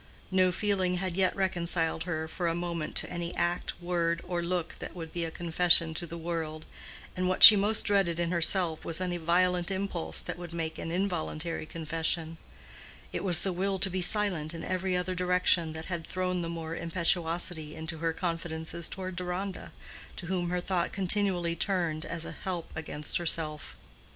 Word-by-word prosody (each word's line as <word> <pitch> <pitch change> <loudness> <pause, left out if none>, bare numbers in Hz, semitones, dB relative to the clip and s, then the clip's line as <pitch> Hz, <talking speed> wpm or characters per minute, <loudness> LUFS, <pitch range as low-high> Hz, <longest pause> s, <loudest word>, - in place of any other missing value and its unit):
No 185 -1 +3
feeling 185 -1 0
had 185 -1 -3
yet 190 -1 +2
reconciled 170 -4 0
her 160 -3 -3
for 175 +2 -3
a 165 - 0
moment 170 -2 -4
to - - 0
any 175 -1 -4
act, 175 +1 -2
word, 170 -1 0
or 175 -1 -2
look 175 -1 -3
that - - -8
would 165 -2 -8
be 170 -1 -2
a - - -3
confession 170 0 +6
to 170 +2 -4
the 170 +1 -7
world: 160 -2 -4 0.5
and 185 0 -1
what 185 - +1
she 215 - +15
most 205 +2 +2
dreaded 195 -5 +1
in 170 0 0
herself 170 -1 0
was 165 +1 0
any 180 -1 -2
violent 175 +2 +1
impulse 190 - -2
that - - -5
would 175 -1 -8
make 160 -1 -4
an - - -5
involuntary 170 -3 -3
confession: 165 0 -3 0.7
it - - -3
was 175 -3 +3
the 190 - -1
will 195 +2 -1
to 190 0 +3
be 185 +1 -2
silent 180 -5 +2
in 165 - -7
every 185 0 -1
other 180 +1 -2
direction 180 -2 +1
that 160 0 -7
had 170 -3 -5
thrown 185 -1 -2
the 165 - -4
more 165 -1 -5
impetuosity 165 -2 -1
into 160 0 -6
her 165 0 0
confidences 165 -1 -4
toward 185 -1 -6
Deronda, 180 +2 -4 0.4
to 175 - -7
whom 175 -1 -2
her 180 0 -1
thought 175 -1 -1
continually 185 -3 0
turned 170 -5 -1
as 165 -1 -4
a - - -5
help 180 -3 -5
against 150 -1 -2
herself. 160 -3 -2
175 Hz, 180 wpm, -29 LUFS, 165-185 Hz, 0.7 s, she